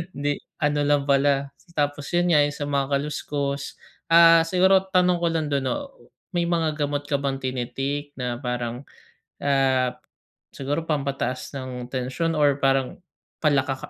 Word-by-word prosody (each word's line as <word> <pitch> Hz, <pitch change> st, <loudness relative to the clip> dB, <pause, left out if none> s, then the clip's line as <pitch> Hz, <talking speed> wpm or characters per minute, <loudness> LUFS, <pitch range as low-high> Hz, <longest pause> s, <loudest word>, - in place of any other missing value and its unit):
'di 145 Hz, +1 st, -1 dB, 0.2 s
ano 145 Hz, 0 st, +2 dB
lang 145 Hz, -1 st, +3 dB
pala, 140 Hz, 0 st, +2 dB, 0.2 s
tapos 145 Hz, -1 st, -1 dB
yun 175 Hz, 0 st, +2 dB
nga 155 Hz, -, +5 dB
yung 145 Hz, -1 st, +2 dB
sa -, -, -4 dB
mga 140 Hz, -1 st, +1 dB
kaluskos. 140 Hz, -1 st, -3 dB, 0.3 s
Ah, 165 Hz, 0 st, +7 dB
siguro 190 Hz, +2 st, +4 dB
tanong 180 Hz, -2 st, +3 dB
ko 170 Hz, -, +1 dB
lang 160 Hz, -3 st, -1 dB
do'n 140 Hz, -1 st, +1 dB
'no, 280 Hz, -, -3 dB, 0.4 s
may 175 Hz, -2 st, 0 dB
mga 160 Hz, -3 st, 0 dB
gamot 145 Hz, 0 st, -2 dB
ka 145 Hz, -1 st, -1 dB
bang 140 Hz, -1 st, -1 dB
tini-take 135 Hz, +3 st, -3 dB
na 125 Hz, -2 st, -3 dB
parang, 125 Hz, 0 st, -4 dB, 0.6 s
ah, 130 Hz, -2 st, +2 dB, 0.6 s
siguro 145 Hz, +4 st, -2 dB
pampataas 140 Hz, -3 st, -2 dB
ng 130 Hz, -2 st, -6 dB
tensyon 130 Hz, +6 st, -1 dB
or 145 Hz, -2 st, +3 dB
parang 135 Hz, -2 st, +1 dB, 0.4 s
pala 145 Hz, -3 st, +3 dB
ka 135 Hz, -, -2 dB
145 Hz, 150 wpm, -24 LUFS, 135-155 Hz, 0.6 s, Ah